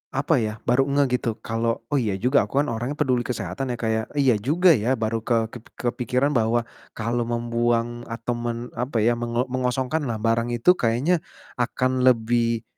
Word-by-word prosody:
apa 140 +1 +2
ya, 110 0 -3
baru 135 +3 +3
engah 140 0 +3
gitu 125 -1 0
kalau, 115 0 -1
“Oh 145 - +3
iya 105 -6 -1
juga, 125 +8 +2
aku 135 - -5
kan 145 - -3
orangnya 120 +6 -3
peduli 130 -5 +1
kesehatan," 120 +1 -4
ya, 120 - -1
Kak, 115 -1 -2
ya. 110 - +1 0.2
Iya 135 -3 +4
juga 170 - +4
ya, 125 0 +1
baru 110 0 -1
ke 115 -1 +1
kep 120 -2 -10
kepikiran 125 +3 0
bahwa 120 -1 +1 0.3
kalau 120 +2 -1
membuang 120 0 0
atau 115 +1 -3
men 120 0 -4
apa 125 0 -2
ya, 120 +2 +4
mengo 120 +1 -1
mengosongkanlah 130 0 -1
barang 115 +2 0
itu 120 +10 +5
kayaknya 140 +5 +1 0.4
akan 130 +1 0
lebih 115 -2 +2
120 Hz, 180 wpm, -24 LUFS, 115-130 Hz, 0.4 s, itu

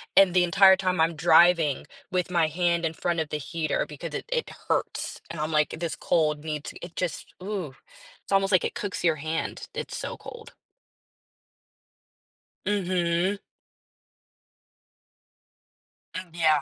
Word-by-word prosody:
and 190 -3 +7
the 180 -1 +5
entire 190 +2 +7
time 185 -3 0
I'm 165 0 +2
driving 165 -2 +4 0.2
with 180 -1 0
my 170 -3 +2
hand 170 +1 +1
in 160 - -1
front 170 +1 -1
of 155 - -2
the 150 - -2
heater 155 +2 -2
because - - -7
it - - -4
it 475 -1 -1 0.2
hurts. - - -1
And 165 - -6
I'm 155 +1 -2
like, 150 -1 +2
"This 170 -1 -2
cold 150 -2 +1
needs" 150 -2 -4
It 175 0 -9
just 180 -4 -4
Ooh, 185 -7 -4 0.5
it's - - -14
almost 195 0 +3
like 185 - +4
it - - -3
cooks 195 -4 -4
your 165 -2 +4
hand, 155 +2 -4
it's - - -5
so - - -5
cold. 460 -2 -11 2.1
Mhm. 185 -1 +1 2.8
Mm, 185 -1 -5
yeah. 155 -3 +3
170 Hz, 145 wpm, -26 LUFS, 160-185 Hz, 2.8 s, and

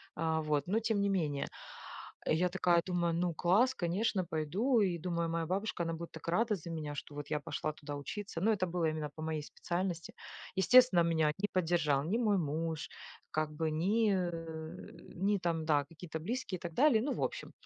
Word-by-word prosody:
а, 160 0 0
вот, 150 -1 0
но 215 +4 +2
тем 220 -2 0
не 200 - +2
менее. 155 -7 0 0.8
И 155 - +4
я 180 +2 +2
такая 175 -2 +3
думаю: 175 -2 0
"Ну 175 0 0
класс, 215 +11 +4
конечно, 185 0 0
пойду!" 185 - +1
И 180 -3 +1
думаю, 170 -1 -1
моя 165 0 -1
бабушка 190 0 -1
она 165 0 -2
будет 170 +1 -6
так 160 +1 -10
рада 215 +5 +2
за 170 -1 -8
меня, 150 -2 -4
что 145 - -7
вот 145 0 -6
я 150 - +1
пошла 145 +2 -3
туда 145 -1 -7
учиться. 165 +5 -5
Ну 220 +4 +4
это 185 -3 +1
было 175 -1 -1
именно 155 -2 -3
по 155 - -8
моей 155 -1 -2
специальности. 175 +1 -3 0.4
Естественно, 245 -2 +7
меня 160 -2 +2
не 205 - +1
поддержал 165 -6 +2
ни 205 +7 +1
мой 210 -4 +3
муж, 160 +1 -2 0.4
как 155 0 0
бы 160 +1 -1
ни, 205 +7 +2
э, 165 -3 -4 0.2
ни 200 +3 +2
там 165 -3 -1
да 145 -3 +3
какие-то 160 +1 -7
близкие 195 +1 -3
и - - -24
так 170 -2 -5
далее, 255 - +5
ну 280 - -1
в - - -4
общем. - - -3
170 Hz, 200 wpm, -33 LUFS, 160-195 Hz, 0.8 s, Естественно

